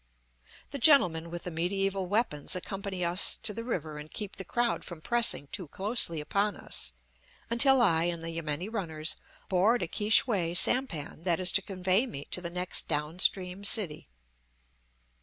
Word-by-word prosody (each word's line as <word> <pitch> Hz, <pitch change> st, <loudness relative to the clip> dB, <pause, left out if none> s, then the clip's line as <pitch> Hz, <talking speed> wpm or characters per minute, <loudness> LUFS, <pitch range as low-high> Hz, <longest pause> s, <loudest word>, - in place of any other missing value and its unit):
The 280 Hz, -, -5 dB
gentlemen 180 Hz, -, +4 dB
with 175 Hz, 0 st, -7 dB
the 180 Hz, -, -5 dB
mediaeval 195 Hz, +3 st, -1 dB
weapons 185 Hz, -6 st, -1 dB
accompany 190 Hz, 0 st, -4 dB
us 175 Hz, +3 st, +2 dB
to 210 Hz, -, -1 dB
the 230 Hz, -, -6 dB
river 160 Hz, -10 st, -4 dB
and 150 Hz, +1 st, -9 dB
keep 205 Hz, +2 st, -5 dB
the 190 Hz, -, -5 dB
crowd 240 Hz, +5 st, -1 dB
from 175 Hz, -3 st, -9 dB
pressing 235 Hz, -5 st, +1 dB
too 185 Hz, -5 st, -4 dB
closely 195 Hz, -2 st, +1 dB
upon 200 Hz, +6 st, -1 dB
us -, -, -4 dB, 0.6 s
until 260 Hz, +2 st, +5 dB
I 165 Hz, -6 st, +3 dB
and 170 Hz, -1 st, -3 dB
the 165 Hz, -, -3 dB
yameni 165 Hz, +1 st, -3 dB
runners 160 Hz, -8 st, -4 dB, 0.3 s
board 195 Hz, +4 st, +2 dB
a -, -, -3 dB
Ki 210 Hz, +5 st, -3 dB
shway 190 Hz, -7 st, +3 dB
sampan 175 Hz, -, +1 dB
that 175 Hz, -2 st, +2 dB
is 185 Hz, -1 st, +2 dB
to 195 Hz, -, +2 dB
convey 190 Hz, +5 st, 0 dB
me 140 Hz, -, -7 dB
to 180 Hz, -, 0 dB
the 170 Hz, -, -3 dB
next 180 Hz, +1 st, +1 dB
down 150 Hz, +2 st, -2 dB
stream 185 Hz, +1 st, +1 dB
city. 195 Hz, -7 st, +2 dB
185 Hz, 170 wpm, -29 LUFS, 165-210 Hz, 0.6 s, until